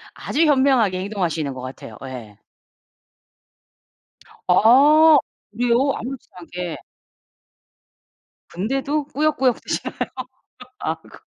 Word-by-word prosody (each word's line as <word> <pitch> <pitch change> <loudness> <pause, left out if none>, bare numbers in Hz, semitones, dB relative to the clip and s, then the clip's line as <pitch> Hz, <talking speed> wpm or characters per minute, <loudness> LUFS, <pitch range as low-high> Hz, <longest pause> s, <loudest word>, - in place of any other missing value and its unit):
아주 325 +3 0
현명하게 260 -10 +3
행동하시는 175 -8 -2
것 130 - -8
같아요. 130 -4 -9
예. 120 -6 -9 2.1
아. 290 - +6 0.3
그래요? 245 +5 +1
아무렇지도 260 +2 -8
않게. 175 -1 -6 1.7
근데도 270 - -2
꾸역꾸역 280 -4 0
드시나요? - - -4 0.8
아 160 - -2
그렇구나. - - -19
230 Hz, 230 characters per minute, -21 LUFS, 170-275 Hz, 2.1 s, 아